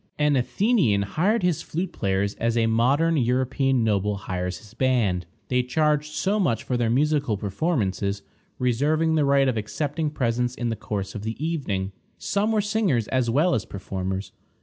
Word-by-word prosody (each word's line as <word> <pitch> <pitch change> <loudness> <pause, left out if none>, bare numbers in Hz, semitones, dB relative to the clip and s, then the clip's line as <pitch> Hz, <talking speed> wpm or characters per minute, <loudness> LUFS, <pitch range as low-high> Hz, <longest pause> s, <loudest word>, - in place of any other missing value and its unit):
An 150 -1 +3
Athenian 130 - +2
hired 185 - +1
his 175 -4 +1
flute 175 +3 -3
players 100 0 0
as 115 0 0
a 115 - +3
modern 135 +9 +2
European 130 0 +1
noble 105 -1 +1
hires 90 -3 -4
his 105 +2 -16
band. 110 -10 +1 0.2
They 125 0 +2
charged 150 +3 0
so 205 +2 +1
much 115 - +1
for 125 - -2
their 120 -2 +1
musical 140 -2 +1
performances, 100 - -1 0.3
reserving 150 +6 +1
the 155 -2 +3
right 140 -1 +4
of 125 -3 0
accepting 145 +9 -2
presents 125 -3 -1
in 120 -1 -2
the 115 - -1
course 100 -2 -4
of 105 - -5
the 110 +2 -4
evening. 130 - -2 0.3
Some 205 +2 0
were 215 -1 +2
singers 200 - +1
as 130 -2 +1
well 150 +9 +3
as 105 - 0
performers. 95 0 -4
125 Hz, 170 wpm, -24 LUFS, 105-150 Hz, 0.3 s, right